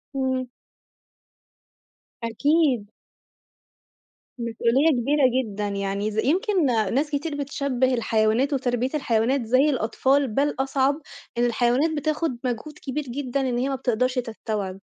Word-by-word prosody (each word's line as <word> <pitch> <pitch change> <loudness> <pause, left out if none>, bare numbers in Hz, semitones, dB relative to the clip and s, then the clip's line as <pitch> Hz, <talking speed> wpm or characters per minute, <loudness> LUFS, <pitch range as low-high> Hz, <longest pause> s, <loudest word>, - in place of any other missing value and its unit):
إمم. 260 -1 -1 1.7
أكيد. 250 -1 +1 1.5
مسؤولية 235 +5 +2
كبيرة 285 +4 +1 0.2
جدًا 210 -2 -4
يعني 200 +1 -2
ز 215 - -7
يمكن 365 - +2
ناس 245 +4 +1
كتير 290 +1 -2
بتشبِه 275 -2 0
الحيوانات، 230 +3 +1
وتربية 250 -1 0
الحيوانات 245 -1 +1
زي 255 +6 +4
الأطفال، 265 +2 +1
بل 280 +6 0
أصعب. 270 +2 +1 0.4
الحيوانات 240 +5 +2
بتاخد 310 -2 -1
مجهود 255 +5 -4
كبير 295 +2 -3
جدًا 275 +1 -3
إن 255 -2 -1
هي 260 +3 0
ما 270 - -1
بتقدرش 255 +1 0
تستوعب. 215 -5 -4
255 Hz, 115 wpm, -24 LUFS, 230-280 Hz, 1.7 s, زي